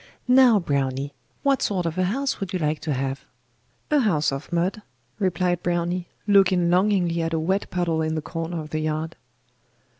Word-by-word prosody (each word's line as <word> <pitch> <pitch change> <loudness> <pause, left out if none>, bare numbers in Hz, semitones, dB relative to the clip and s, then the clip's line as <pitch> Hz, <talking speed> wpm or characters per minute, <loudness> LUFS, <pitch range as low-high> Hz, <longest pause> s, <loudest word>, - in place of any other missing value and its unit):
Now, 250 -4 +6
Browny, 140 -3 -1 0.3
what 275 -1 +2
sort 185 -4 0
of 165 -1 -2
a 185 0 +1
house 265 +8 -1
would 195 -1 -5
you - - +1
like 155 -2 -1
to 155 - -2
have?' 135 +1 -3 0.7
'A 300 - +5
house 175 - +2
of 135 +5 -6
mud,' 180 +5 0 0.4
replied 180 -2 0
Browny, 175 0 -1 0.2
looking 190 -4 +4
longingly 180 -3 +2
at 165 0 -2
a 160 - +1
wet 190 +5 -1
puddle 170 -3 0
in 160 0 -1
the 155 - -2
corner 165 +1 -4
of 155 - -10
the 155 - -1
yard. 155 +1 -2
175 Hz, 180 wpm, -24 LUFS, 155-190 Hz, 0.7 s, Now